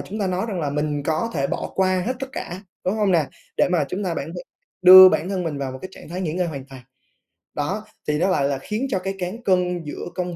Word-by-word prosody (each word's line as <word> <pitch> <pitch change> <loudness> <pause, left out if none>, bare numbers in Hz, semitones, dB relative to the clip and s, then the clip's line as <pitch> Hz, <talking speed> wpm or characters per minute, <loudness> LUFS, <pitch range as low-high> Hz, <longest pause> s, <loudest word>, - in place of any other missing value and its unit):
chúng 210 - -6
ta 200 - 0
nói 185 +3 -1
rằng 190 -5 -3
là 145 -3 -1
mình 150 0 -1
có 160 +10 -1
thể 140 -3 0
bỏ - - -4
qua 185 -1 +2
hết 255 - 0
tất 270 - -4
cả, 185 -6 -6 0.2
đúng 185 - 0
hông 210 -3 +1
nè? 160 -4 +3 0.3
Để - - +3
mà 175 -5 +2
chúng 190 +7 -3
ta 175 -3 -1
bản 140 - -4
thân 175 - -6 0.4
đưa 185 +1 +11
bản 180 0 0
thân 190 -2 -2
mình 155 -4 -3
vào 135 -2 -3
một 130 - -8
cái 185 - -6
trạng - - -13
thái 180 +3 -5
nghỉ 165 -5 -2
ngơi 180 +1 0
hoàn 140 -5 -6
toàn. 135 -2 -12 0.7
Đó, 190 +9 -3 0.2
thì 150 0 +1
nó 185 +3 +2
lại 140 -7 +2
là 140 -1 -2
khiến 220 - -3
cho 190 - 0
cái 195 +1 -4
cán 185 +7 -5
cân 180 -3 +1
giữa 150 - -6
công 180 -1 -3
180 Hz, 270 wpm, -22 LUFS, 150-190 Hz, 0.7 s, đưa